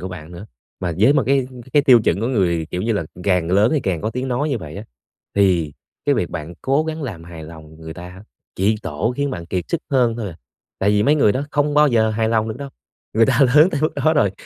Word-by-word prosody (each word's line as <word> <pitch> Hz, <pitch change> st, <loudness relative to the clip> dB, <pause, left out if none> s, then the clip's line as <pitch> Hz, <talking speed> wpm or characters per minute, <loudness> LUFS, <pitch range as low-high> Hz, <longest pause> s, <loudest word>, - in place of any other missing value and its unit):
của 95 Hz, -, -5 dB
bạn 90 Hz, -2 st, -9 dB
nữa. 85 Hz, +5 st, -9 dB, 0.3 s
Mà 90 Hz, -2 st, -2 dB
với 120 Hz, +7 st, +5 dB
một 140 Hz, -, +2 dB
cái 135 Hz, -1 st, +2 dB, 0.3 s
cái 145 Hz, -, +4 dB
tiêu 125 Hz, -4 st, +6 dB
chuẩn 90 Hz, +5 st, +1 dB
của 115 Hz, -, -1 dB
người, 90 Hz, -10 st, 0 dB
kiểu 90 Hz, +1 st, -3 dB
như 115 Hz, -, 0 dB
là, 100 Hz, -6 st, -1 dB, 0.2 s
càng 90 Hz, -4 st, +1 dB
lớn 100 Hz, +4 st, +4 dB
thì 150 Hz, -, +1 dB
càng 90 Hz, -7 st, -2 dB
có 110 Hz, -, -2 dB
tiếng 125 Hz, +2 st, -4 dB
nói 135 Hz, +5 st, -1 dB
như 135 Hz, -5 st, -1 dB
vậy 80 Hz, -4 st, -9 dB
á 105 Hz, -, -7 dB, 0.5 s
thì 90 Hz, -7 st, +2 dB, 0.3 s
cái -, -, +3 dB
việc -, -, -1 dB
bạn 80 Hz, +3 st, -6 dB
cố 140 Hz, +4 st, +1 dB
gắng 160 Hz, 0 st, -4 dB
làm 100 Hz, -, -6 dB
hài 85 Hz, -2 st, -10 dB
lòng 80 Hz, -1 st, -12 dB
người 80 Hz, 0 st, -8 dB
ta 90 Hz, 0 st, -9 dB
ha 95 Hz, +2 st, -12 dB, 0.3 s
chỉ 100 Hz, +4 st, +2 dB
tổ 75 Hz, +11 st, -2 dB
khiến 140 Hz, 0 st, -1 dB
bạn 85 Hz, -9 st, -6 dB
kiệt 90 Hz, 0 st, -2 dB
sức 170 Hz, -, -1 dB
hơn 120 Hz, -4 st, +2 dB
thôi 115 Hz, -, -4 dB
à. 80 Hz, -, -10 dB, 0.4 s
Tại 100 Hz, -, +2 dB
vì 105 Hz, 0 st, +2 dB
mấy 145 Hz, -, +4 dB
người 110 Hz, -9 st, +3 dB
đó 130 Hz, -, -2 dB
không 145 Hz, 0 st, 0 dB
bao 150 Hz, 0 st, +5 dB
giờ 110 Hz, -3 st, +2 dB
hài 110 Hz, +1 st, 0 dB
lòng 110 Hz, -1 st, +1 dB
được 110 Hz, -, -5 dB
đâu, 140 Hz, -1 st, -6 dB, 0.4 s
người 115 Hz, +1 st, +4 dB
ta -, -, +2 dB
lớn 155 Hz, +5 st, +7 dB
tới 145 Hz, -, -2 dB
mức 155 Hz, -, +1 dB
đó 155 Hz, -, +5 dB
rồi 125 Hz, -10 st, +3 dB
110 Hz, 270 wpm, -20 LUFS, 90-135 Hz, 0.5 s, lớn